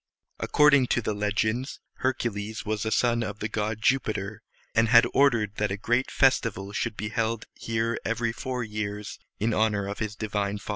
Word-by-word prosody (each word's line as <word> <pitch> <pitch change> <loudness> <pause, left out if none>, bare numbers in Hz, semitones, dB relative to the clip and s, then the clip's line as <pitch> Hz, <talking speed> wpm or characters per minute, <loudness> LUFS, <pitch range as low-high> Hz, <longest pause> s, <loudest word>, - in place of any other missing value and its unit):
According 140 -3 +5
to 120 - +1
the 110 - -1
legends, 110 +5 -1 0.2
Hercules 110 -5 -2
was 110 0 -2
a - - -1
son 120 0 +2
of 105 -2 -4
the 105 - -3
god 110 0 -3
Jupiter, 110 -5 0 0.3
and 115 0 +4
had 115 +1 +7
ordered 115 -7 +3
that 105 -1 +1
a 100 - -2
great 120 +5 0
festival 115 -7 +2
should 110 0 -2
be 105 - -3
held 115 0 -1
here 115 +1 -2
every 115 0 0
four 125 +2 -4
years 105 -1 -5 0.2
in 110 +2 +1
honor 105 -2 +1
of 100 - -5
his 105 -2 -3
divine 105 -2 -2
father. 100 - -12
110 Hz, 180 wpm, -27 LUFS, 105-120 Hz, 0.3 s, had